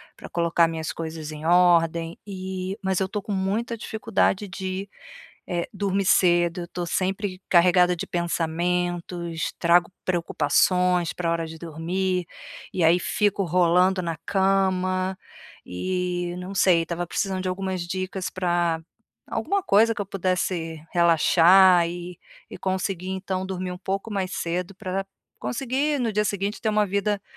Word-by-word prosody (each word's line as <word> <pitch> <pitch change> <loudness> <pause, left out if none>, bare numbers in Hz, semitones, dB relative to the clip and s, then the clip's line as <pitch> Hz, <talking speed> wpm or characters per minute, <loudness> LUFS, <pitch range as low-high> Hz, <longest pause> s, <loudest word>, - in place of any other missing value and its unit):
pra - - -11
colocar 170 0 +2
minhas 160 -1 -4
coisas 160 -1 -6
em 155 +1 -8
ordem, 170 -1 +3
e 190 0 -5
mas 190 -1 +1
eu 190 - 0
estou 205 0 -4
com 210 - -6
muita 205 +5 -1
dificuldade 215 -2 0
de, 190 +1 -5 0.6
eh, 175 -1 -2
dormir 195 -1 -1
cedo, 175 -1 +3
eu - - -5
estou 175 0 -5
sempre 190 +2 -2
carregada 180 0 +5
de - - -5
pensamentos, 175 0 -2
trago 175 +1 +3
preocupações 180 +1 +2
pra 170 -2 -2
hora 165 -1 -1
de 160 0 -9
dormir, 175 +3 -2 0.4
e 180 - -1
aí 165 +2 +5
fico 205 +2 0
rolando 180 +2 +3
na 165 -1 -2
cama, 190 -1 +1 0.5
e 180 - -2
não 180 +2 -6
sei, 180 -3 +4
estava 170 +1 -4
precisando 190 +1 -2
de 185 - -2
algumas 185 -1 -3
dicas 185 +1 -3
pra 175 -3 0 0.5
alguma 395 +3 -1
coisa 225 - +4
que - - -3
eu - - -3
pudesse 180 -4 -2
relaxar 175 +1 +6
e 175 0 -7 0.3
e - - -10
conseguir 190 -1 -2
então 190 0 -3
dormir 185 -1 -4
um 180 - -6
pouco 195 +3 -3
mais 190 -2 -2
cedo 180 +3 -3
pra 190 -1 -3 0.4
conseguir 275 +4 -1
no 235 -3 0
dia 210 +1 +2
seguinte 200 +1 -2
ter 220 - +1
uma 210 -1 +2
vida 200 +1 0
185 Hz, 145 wpm, -24 LUFS, 170-195 Hz, 0.6 s, relaxar